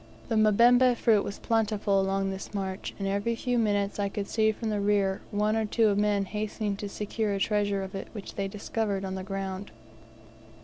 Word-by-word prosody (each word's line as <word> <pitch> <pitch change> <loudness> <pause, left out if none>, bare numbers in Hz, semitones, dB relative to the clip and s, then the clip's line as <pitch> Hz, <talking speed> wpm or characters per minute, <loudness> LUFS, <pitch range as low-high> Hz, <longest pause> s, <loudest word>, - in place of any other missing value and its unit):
The 225 - +1
mbemba 240 +4 +5
fruit 215 -3 +3
was 200 - -5
plentiful 210 -3 +1
along 195 0 0
this 190 +2 -7
march, 190 -1 -4
and 195 - -3
every 200 +4 0
few 245 +1 0
minutes 205 -2 0
I 200 -1 0
could 200 0 -4
see 220 -1 +2
from 220 +1 -4
the 210 - 0
rear 200 -1 +1
one 210 +1 +1
or 225 - +1
two 220 -1 +3
men 205 -1 +2
hastening 210 0 -3
to 205 0 -5
secure 210 +1 -2
a - - -2
treasure 205 -1 +1
of 190 - -7
it 195 - -5
which 210 -3 -8
they 195 -1 -2
discovered 200 0 -2
on 190 - -4
the 190 - -4
ground. 195 0 -4
205 Hz, 195 wpm, -28 LUFS, 195-215 Hz, -, mbemba